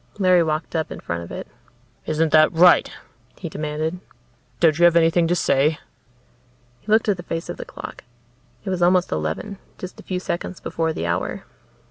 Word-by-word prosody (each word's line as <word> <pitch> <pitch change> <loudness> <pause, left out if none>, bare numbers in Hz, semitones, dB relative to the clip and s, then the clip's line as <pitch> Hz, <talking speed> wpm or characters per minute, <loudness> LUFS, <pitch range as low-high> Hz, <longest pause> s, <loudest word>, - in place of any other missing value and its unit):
Larry 185 -3 +4
walked 160 +1 -2
up 160 -1 -1
in - - -6
front 85 0 -4
of 85 - -10
it. - - -6 0.6
"Isn't 155 0 +1
that 155 0 +6
right?" 175 +2 +5 0.5
he 170 - -6
demanded. 155 +3 -3 0.6
"Don't 160 -2 +3
you 175 - +6
have 170 -1 +5
anything 165 0 +4
to 175 - +1
say?" 150 -2 +2 1.0
He 210 - -7
looked 220 +1 +4
at 205 -3 +2
the - - -6
face 165 -1 -5
of - - -5
the - - -7
clock. - - -9 0.6
It - - -2
was 180 -1 -2
almost 180 +1 +3
eleven, 80 - -3 0.2
just 185 - -8
a - - -11
few 185 -1 -3
seconds 180 0 -4
before 165 -1 -2
the 155 - -4
hour. 85 0 -2
165 Hz, 185 wpm, -22 LUFS, 155-180 Hz, 1.0 s, that